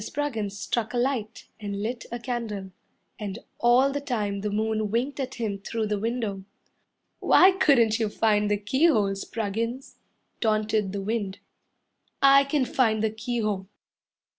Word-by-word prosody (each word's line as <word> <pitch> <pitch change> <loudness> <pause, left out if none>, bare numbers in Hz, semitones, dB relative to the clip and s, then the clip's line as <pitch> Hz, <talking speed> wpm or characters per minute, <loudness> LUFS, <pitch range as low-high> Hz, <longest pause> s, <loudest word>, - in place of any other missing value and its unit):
Spruggins 220 -8 -3
struck 235 +3 -2
a - - +1
light 240 -3 -1
and 205 -1 -4
lit 235 +2 -4
a 240 - -3
candle, 230 -6 -4 0.5
And 205 -1 -4 0.2
all 250 +3 +4
the 285 +1 -3
time 210 -7 -2
the 210 - -2
moon 215 0 -1
winked 250 +7 -1
at 265 -1 -3
him 210 -4 -3
through 220 +2 -3
the 210 -1 -1
window. 220 -3 -2 0.8
"Why 375 +2 +6
couldn't 260 - +3
you 220 -2 0
find 210 -1 +2
the 205 - +2
keyhole, 210 -1 +2
Spruggins?" 225 +5 -4 0.4
Taunted 215 -2 +1
the 200 0 -4
wind. 205 -2 -2 0.8
"I 275 0 +6
can 275 -1 +1
find 220 -4 +1
the 220 - +1
keyhole." 215 -3 -2
220 Hz, 145 wpm, -26 LUFS, 205-250 Hz, 0.8 s, Why